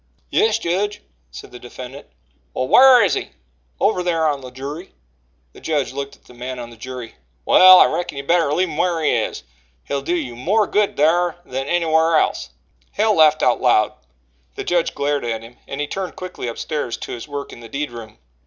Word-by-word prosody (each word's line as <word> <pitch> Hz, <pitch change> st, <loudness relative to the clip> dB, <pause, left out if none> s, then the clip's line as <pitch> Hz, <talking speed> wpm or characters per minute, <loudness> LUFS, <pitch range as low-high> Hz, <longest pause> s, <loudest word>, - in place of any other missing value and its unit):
"Yes, 220 Hz, 0 st, +3 dB
jedge," 205 Hz, +2 st, -2 dB, 0.3 s
said 65 Hz, -, -11 dB
the 125 Hz, -, -11 dB
defendant. 125 Hz, +3 st, -10 dB, 0.5 s
"Well, 130 Hz, -, -1 dB
whar 255 Hz, -3 st, +7 dB
is 195 Hz, -, +2 dB
he?" -, -, -4 dB, 0.5 s
"Over 180 Hz, -, +2 dB
thar 165 Hz, -3 st, +1 dB
on 140 Hz, -1 st, -5 dB
the 130 Hz, -, -9 dB
jury." 140 Hz, +8 st, -8 dB, 0.6 s
The -, -, -15 dB
judge 150 Hz, -5 st, -1 dB
looked 140 Hz, 0 st, -5 dB
at -, -, -29 dB
the -, -, -16 dB
man 125 Hz, +1 st, -6 dB
on 120 Hz, -1 st, -8 dB
the -, -, -13 dB
jury. 125 Hz, -, -9 dB, 0.3 s
"Well, 185 Hz, 0 st, +8 dB
I -, -, +8 dB
reckon 160 Hz, -3 st, -3 dB
you 140 Hz, -, -4 dB
better 165 Hz, 0 st, +2 dB
leave 185 Hz, +5 st, +1 dB
him 150 Hz, -, -7 dB
whar 170 Hz, -2 st, 0 dB
he -, -, +3 dB
is. -, -, -2 dB, 0.4 s
He'll 140 Hz, -1 st, -3 dB
do 170 Hz, +6 st, -1 dB
you 135 Hz, -8 st, -4 dB
more 200 Hz, -, +1 dB
good 205 Hz, 0 st, 0 dB
thar 170 Hz, +3 st, +2 dB
than 135 Hz, +1 st, -4 dB
any 175 Hz, +1 st, +1 dB
whar 160 Hz, 0 st, +3 dB
else." -, -, -1 dB, 0.4 s
Hale 215 Hz, +1 st, +2 dB
laughed 155 Hz, -1 st, +4 dB
aloud 120 Hz, -3 st, +3 dB, 0.6 s
the -, -, -5 dB
judge 175 Hz, -1 st, 0 dB
glared 145 Hz, 0 st, -1 dB
at 115 Hz, -1 st, -3 dB
him 120 Hz, +2 st, -14 dB
and 140 Hz, -, -6 dB
he 150 Hz, -, 0 dB
turned 185 Hz, +3 st, -5 dB
quickly 185 Hz, -8 st, -7 dB
upstairs 120 Hz, +1 st, -4 dB
to -, -, -8 dB
his 120 Hz, +4 st, -7 dB
work 145 Hz, -1 st, -6 dB
in -, -, -12 dB
the 115 Hz, -1 st, -12 dB
deed 145 Hz, -1 st, -4 dB
room. 115 Hz, -2 st, -10 dB
150 Hz, 205 wpm, -20 LUFS, 125-175 Hz, 0.6 s, Well